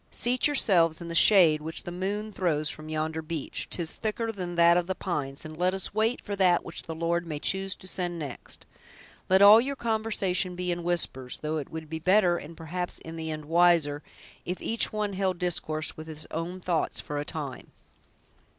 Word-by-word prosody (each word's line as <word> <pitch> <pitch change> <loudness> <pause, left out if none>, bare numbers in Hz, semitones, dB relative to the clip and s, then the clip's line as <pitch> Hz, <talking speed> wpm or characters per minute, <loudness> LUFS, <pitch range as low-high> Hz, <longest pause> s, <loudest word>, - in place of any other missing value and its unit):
Seat 250 +3 +1
yourselves 175 - +3
in 170 -1 -7
the - - -4
shade 165 -4 +6
which 160 +2 -1
the 175 - -6
moon 200 +4 -3
throws 155 -6 0
from 155 0 -9
yonder 155 +1 -2
beech—'tis 160 +1 -2
thicker 225 +1 -2
than 180 -4 -5
that 170 0 +6
of 175 0 +1
the 190 - -2
pines—and 150 -2 -4
let 180 +3 +1
us 190 - -3
wait 220 +3 +1
for 205 - -3
that 180 -3 +3
which - - -6
the 165 - -7
Lord 170 +1 -1
may 155 -2 -3
choose 190 +5 -1
to - - -13
send 175 -2 -2
next. 145 -6 -7 0.6
Let 190 +1 +6
all 210 +3 +10
your 275 +3 -3
conversation 215 -6 0
be 180 0 -2
in 175 0 -2
whispers; 165 -7 -2
though 155 +1 -1
it 145 - -5
would 160 -1 -7
be 160 +1 -5
better, 185 0 +4
and, 165 +1 -9
perhaps, 175 +2 -4
in 160 0 -9
the 160 -1 -5
end, 155 -1 -5
wiser, 165 -3 +3 0.4
if 180 +1 -4
each 230 - 0
one 210 -2 -2
held 190 -1 0
discourse 160 -3 -2
with 155 0 -9
his 155 -1 -8
own 170 +3 -4
thoughts, 175 -3 -1
for 145 0 -4
a - - -2
time." 150 -5 -5
175 Hz, 195 wpm, -28 LUFS, 160-190 Hz, 0.6 s, all